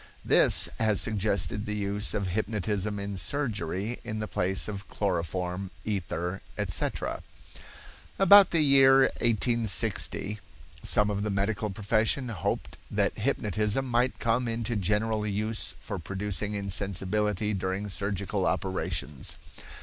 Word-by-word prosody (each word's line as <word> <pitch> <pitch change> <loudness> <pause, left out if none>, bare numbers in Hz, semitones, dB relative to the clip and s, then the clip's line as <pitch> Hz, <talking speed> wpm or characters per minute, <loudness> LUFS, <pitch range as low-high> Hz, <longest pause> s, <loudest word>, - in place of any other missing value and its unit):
This - - +5
has 110 -3 +2
suggested 105 0 0
the 105 - -2
use 105 0 0
of 100 -3 -1
hypnotism 105 0 -1
in 100 -1 -4
surgery 105 - -1
in 110 -3 -5
the 105 0 -3
place 95 0 0
of 100 -2 -6
chloroform, 90 0 -2 0.2
ether, 90 -2 -3 0.2
etc. - - -2 1.0
About 195 0 +8
the 165 - +2
year 135 -1 +6 0.2
1860 110 -2 0 0.4
some 105 0 +2
of 100 0 -2
the 105 - -1
medical 100 +2 -1
profession 110 +6 +1
hoped 95 -8 -3
that - - 0
hypnotism 105 +5 0
might 125 0 +1
come 120 +2 0
into 115 0 -1
general 105 +2 0
use 105 +2 0
for 100 -4 -5
producing 100 +3 -2
insensibility 100 +1 0
during 95 +1 -2
surgical 100 0 -1
operations. 90 -6 -2
105 Hz, 120 wpm, -28 LUFS, 95-110 Hz, 1.0 s, About